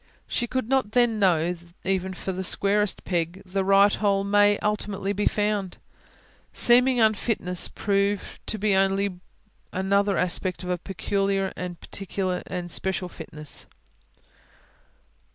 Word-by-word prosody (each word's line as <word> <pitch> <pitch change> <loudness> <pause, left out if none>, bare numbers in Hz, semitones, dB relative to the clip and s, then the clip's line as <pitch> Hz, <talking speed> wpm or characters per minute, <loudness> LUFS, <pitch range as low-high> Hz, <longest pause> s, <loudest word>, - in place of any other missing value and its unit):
She 240 - -1
could 260 -1 -2
not 260 -5 +1
then 240 -3 +3
know 175 -3 +3
that, 175 0 -17
even 190 0 -1
for 190 - -4
the 190 0 -4
squarest 200 +2 +1
peg, 175 +1 -2
the 190 +1 -1
right 195 +1 +5
hole 200 -2 +1
may 205 +1 +4
ultimately 205 -1 -1
be 205 +1 +1
found; 205 -3 -1 0.7
seeming 250 +1 +4
unfitness 215 -4 +1
prove 200 0 -1
to 220 - -1
be 210 0 +1
only 195 -1 +1 0.5
another 200 +1 +1
aspect 180 +1 0
of 180 - -3
a 180 - -1
peculiar 195 +2 -1
and 180 0 -4
special 190 -1 -2
fitness. 155 -3 -3
195 Hz, 125 wpm, -25 LUFS, 180-205 Hz, 0.7 s, right